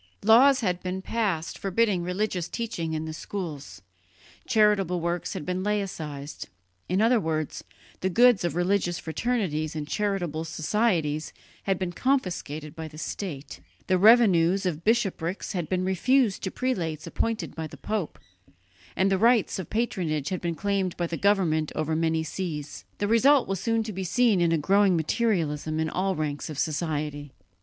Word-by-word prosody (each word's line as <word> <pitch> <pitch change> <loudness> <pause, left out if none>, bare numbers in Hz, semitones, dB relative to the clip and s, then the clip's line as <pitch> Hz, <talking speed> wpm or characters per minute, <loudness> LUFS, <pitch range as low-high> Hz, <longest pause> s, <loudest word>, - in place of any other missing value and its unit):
Laws 255 +5 +6
had 180 -4 -1
been 185 +1 -4
passed 195 -9 -2
forbidding 195 -1 +1
religious 180 0 -2
teaching 175 -9 -3
in 155 0 -2
the 160 - -5
schools; 150 - -6 0.6
charitable 210 -6 +3
works 170 +3 -2
had 185 -7 -5
been 180 0 -2
"laicized": 165 -8 -4 0.4
in 190 +4 +2
other 235 +1 +4
words, 155 -4 -3 0.4
the 190 - 0
goods 240 +1 +5
of 170 -2 -1
religious 175 -1 +1
fraternities 160 -4 -2
and 150 -1 -4
charitable 180 -5 -1
societies 160 -2 0 0.3
had 195 -2 +1
been 185 -1 -3
confiscated 175 - -2
by 160 -1 -6
the 155 0 -12
state, 155 -4 -6 0.3
the 185 -1 +2
revenues 195 -4 +5
of 165 -3 -2
bishoprics 195 -5 0
had 175 -4 -3
been 185 0 0
refused 220 +4 +2
to 190 - -2
prelates 170 - -2
appointed 225 -1 -2
by 160 -1 -5
the - - -12
pope, 210 -6 -3 0.8
and 195 +1 +2
rights 230 -4 +3
of 180 - -6
patronage 175 - -1
had 185 - -3
been 170 -1 -2
claimed 195 -1 -1
by 175 - 0
the 170 - -3
government 170 -6 +2
over 155 0 -1
many 160 0 +1
sees. 150 -4 -5
The 205 - -1
result 255 +5 +4
was 195 -2 -2
soon 225 +3 0
to 215 -1 -6
be 190 +1 -4
seen 210 +1 +3
in 170 -1 +3
a 165 - +3
growing 195 +4 +3
materialism 160 -4 0
in 160 0 -1
all 190 +1 0
ranks 150 -2 -3
of 155 - -6
society. 150 -2 -2
180 Hz, 160 wpm, -26 LUFS, 160-205 Hz, 0.8 s, Laws